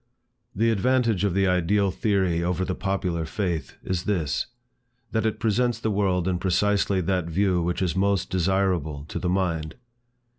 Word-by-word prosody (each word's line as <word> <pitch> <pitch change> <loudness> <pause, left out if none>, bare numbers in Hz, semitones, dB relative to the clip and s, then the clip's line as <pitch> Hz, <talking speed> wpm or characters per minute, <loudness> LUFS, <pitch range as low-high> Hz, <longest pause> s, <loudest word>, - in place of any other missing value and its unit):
The 115 +3 +2
advantage 115 -2 +2
of 100 -3 +1
the 95 0 +3
ideal 95 +2 +2
theory 95 -5 +1
over 90 +1 0
the 95 - -2
popular 90 -4 -1
faith, 85 -1 -3
is 90 0 -2
this, 85 -8 0 0.6
that 110 -1 +1
it 110 - -2
presents 120 +2 +1
the 110 - -1
world 95 -3 +1
in 90 -2 0
precisely 100 +1 +1
that 90 0 0
view 90 +1 +1
which 90 +2 -1
is 85 -3 -1
most 100 -1 +1
desirable 90 -5 0
to - - -3
the 90 - -1
mind. 85 -4 -1
95 Hz, 160 wpm, -25 LUFS, 90-100 Hz, 0.6 s, the